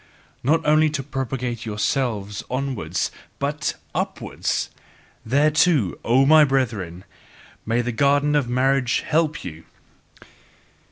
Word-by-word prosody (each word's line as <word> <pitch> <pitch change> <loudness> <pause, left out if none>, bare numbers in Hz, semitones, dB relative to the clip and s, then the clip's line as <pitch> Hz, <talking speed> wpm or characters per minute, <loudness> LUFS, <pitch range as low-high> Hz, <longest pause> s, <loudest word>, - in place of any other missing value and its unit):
Not 150 +7 +1
only 155 +1 +4
to 135 - -4
propagate 125 -3 -3
yourselves 105 -2 -2
onwards 130 -2 -2 0.3
but 150 +2 -2 0.2
UPWARDS - - -2 0.5
thereto, 145 - +3
O 130 +4 +4
my 155 +2 +7
brethren, 110 - -1 0.6
may 115 +2 +1
the 125 - -2
garden 145 +3 +2
of 140 -5 +1
marriage 130 0 +2
help 155 -1 0
you! 80 -2 -8
135 Hz, 105 wpm, -22 LUFS, 115-145 Hz, 0.6 s, my